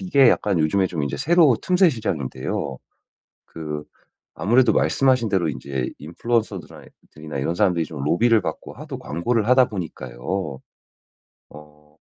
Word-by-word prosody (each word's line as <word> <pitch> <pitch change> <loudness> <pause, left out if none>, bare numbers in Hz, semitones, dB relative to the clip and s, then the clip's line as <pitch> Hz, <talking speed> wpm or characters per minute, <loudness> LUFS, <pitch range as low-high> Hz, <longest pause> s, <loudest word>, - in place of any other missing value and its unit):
이게 140 -9 +4
약간 100 -6 +2
요즘에 95 +5 +2
인제 70 -1 -2
새로 160 - +4
틈새시장인데요. 95 - 0 0.7
그 75 -2 -6 0.5
아무래도 120 +9 +3
말씀하신 130 -4 +2
대로 90 -5 +1
인제 65 -1 -4
인플루언서들아 105 +4 -3 0.3
들이나 75 -2 -7
이런 80 +5 -1
사람들이 90 -5 +2
좀 75 -3 -7
로비를 110 +9 +3
받고 - - -6
하도 - - -8
광고를 105 +8 -1
하다 125 0 +5
보니까요. 75 - -5 0.9
어 75 0 -16
90 Hz, 325 characters per minute, -22 LUFS, 75-120 Hz, 0.9 s, 하다